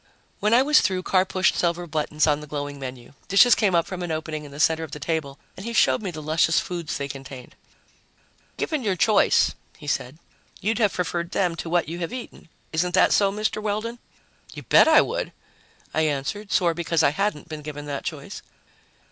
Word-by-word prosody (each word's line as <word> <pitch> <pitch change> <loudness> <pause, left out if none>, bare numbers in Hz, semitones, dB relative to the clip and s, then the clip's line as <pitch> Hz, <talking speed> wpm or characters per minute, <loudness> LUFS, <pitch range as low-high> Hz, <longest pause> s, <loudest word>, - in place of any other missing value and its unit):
When 210 - +1
I 255 - +5
was 300 +2 +5
through, 185 -1 -1
Carr 185 0 +2
pushed 190 0 +1
several 175 0 0
buttons 155 -1 0
on 150 -1 +2
the 150 - -10
glowing 145 -1 -5
menu. 130 -1 -8
Dishes 220 +6 +6
came 200 -5 +2
up 170 - +3
from 185 -1 -6
an 175 - -4
opening 155 -1 -4
in 145 - -11
the 140 - -10
center 160 +1 +2
of 150 -3 -8
the 150 - -6
table 145 -2 -3 0.2
and 190 - -9
he 235 +2 -4
showed - - +3
me 200 - -3
the 155 -3 -7
luscious 160 +1 +2
foods 170 -3 -4
they 140 - -3
contained. 135 -2 -9 1.0
"Given 310 -4 -1
your 200 -5 0
choice," 210 +4 +3 0.2
he 155 - -12
said, 140 -1 -2 0.4
"you'd 220 +3 -1
have 210 -4 +2
preferred 170 -1 -2
them 180 -3 +1
to 165 - -5
what 175 -2 +1
you 170 +2 -5
have 170 - -3
eaten. 245 -8 -9 0.2
Isn't 175 +2 0
that - - +5
so, 200 -1 +3
Mr. 215 +1 -2
Weldon?" 215 +3 -3 0.6
"You - - -8
bet - - +6
I 320 -1 +7
would!" - - -3 0.6
I 160 - +1
answered, 150 +9 -3
sore 175 -4 +3
because 165 -1 0
I - - +4
hadn't 195 -3 -2
been 155 -1 -7
given 145 -1 -7
that 140 -1 -4
choice. - - -6
170 Hz, 205 wpm, -24 LUFS, 150-200 Hz, 1.0 s, I